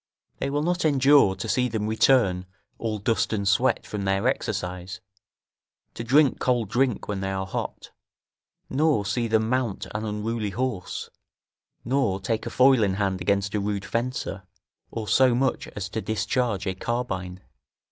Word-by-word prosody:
They 135 - -1
will 145 +1 0
not 175 +2 0
endure 140 -8 +5
to 95 - -5
see 125 -1 +2
them 110 -3 -2
return 110 -5 +3 0.3
all 110 -2 -2
dust 110 +2 0
and 100 -2 -1
sweat 110 +6 +2
from 105 - -5
their 95 +4 +1
exercise, 95 -6 -3 0.9
to 115 - -6
drink 140 +4 +4
cold 120 -5 +1
drink 125 0 0
when 100 -2 -2
they 95 0 -2
are 95 0 -2
hot, 95 - -5 0.8
nor 145 -6 +1
see 115 +3 0
them 110 0 +2
mount 125 -4 -1
an 105 +1 -3
unruly 105 0 -2
horse, 115 -4 -3 0.7
nor 120 -7 +1
take 110 +4 -2
a - - -2
foil 130 -1 +5
in 100 -3 +2
hand 95 -2 -1
against 100 -1 0
a 105 - +1
rude 100 0 -2
fencer, 115 -4 -3 0.5
or 110 -2 -5
so 130 0 +4
much 130 +1 0
as 100 -1 -3
to 110 - -3
discharge 110 -1 -1
a 95 - -1
carbine. 95 -4 -3
110 Hz, 160 wpm, -25 LUFS, 100-125 Hz, 0.9 s, endure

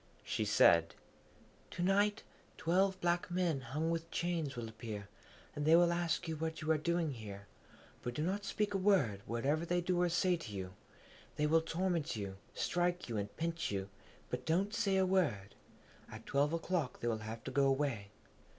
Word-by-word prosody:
She - - -1
said, 85 0 +5 0.7
'To 175 - -3
night, 205 +3 +2 0.3
twelve 190 +3 +2
black 175 0 +1
men 175 -6 0
hung 150 +7 -2
with 165 0 -3
chains 165 -6 -1
will 120 -1 -4
appear, 110 -2 -7 0.5
and 145 - -2
they 160 +2 +6
will 170 0 +5
ask 170 -1 0
what 160 0 -3
you 155 0 0
are 160 - +4
doing 170 0 0
here. 100 -5 -8 0.6
But 120 0 -4
do 150 - -1
not 195 +4 -1
speak 205 +1 -1
a 195 - +1
word, 150 - +3
whatever 140 +7 0
they 175 +1 +1
do 175 0 +1
or 175 - +3
say 180 +1 +2
to 145 -10 -8
you. 95 -2 -5 0.6
They 150 - +1
will 160 +2 +4
torment 165 -3 -1
you, 100 -3 -5 0.2
strike, 175 0 0
and 105 -2 -3
pinch 165 0 -1
you, 100 -1 -3 0.4
but - - -2
don't 190 +6 +1
say 195 -2 +1
a 190 - +4
word. 150 - +1 0.6
At - - -9
twelve 140 +2 +2
o'clock 165 -5 -1
they 120 - -1
will 115 -2 0
have 110 +1 -7
to 130 - -5
go 140 +1 +3
away. 135 -7 0
160 Hz, 180 wpm, -35 LUFS, 120-175 Hz, 0.7 s, they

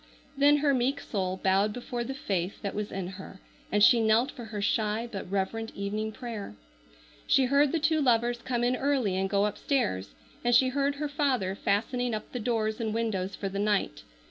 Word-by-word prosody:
Then 285 +1 +5
her 285 -1 +2
meek 265 +2 +1
soul 190 -6 -2
bowed 195 +2 +3
before 245 0 -4
the 265 +3 -5
faith 190 -7 -2
that 200 - -2
was 210 0 -4
in 195 -1 -3
her 190 +1 -9 0.3
and 205 0 +3
she 235 +1 +7
knelt 225 +5 +3
for 240 - -9
her 215 -1 -6
shy 215 +2 0
but 195 -4 -6
reverent 200 +4 -2
evening 210 +2 -3
prayer. 220 - -7 0.7
She 265 - +4
heard 280 +2 +3
the - - +1
two 315 0 +2
lovers 240 -2 +2
come 240 -2 -1
in 245 +1 +2
early 260 -8 +1
and 190 +1 0
go 200 0 +2
upstairs, 95 - -1 0.3
and 240 0 +3
she 260 +2 +5
heard 280 +2 0
her 300 +1 -2
father 270 -10 0
fastening 230 +4 0
up 215 - -7
the 250 - -4
doors 220 -1 -1
and 220 -1 -2
windows 195 -5 -1
for 200 - -4
the 195 +1 -4
night. 205 - 0
225 Hz, 195 wpm, -28 LUFS, 200-255 Hz, 0.7 s, she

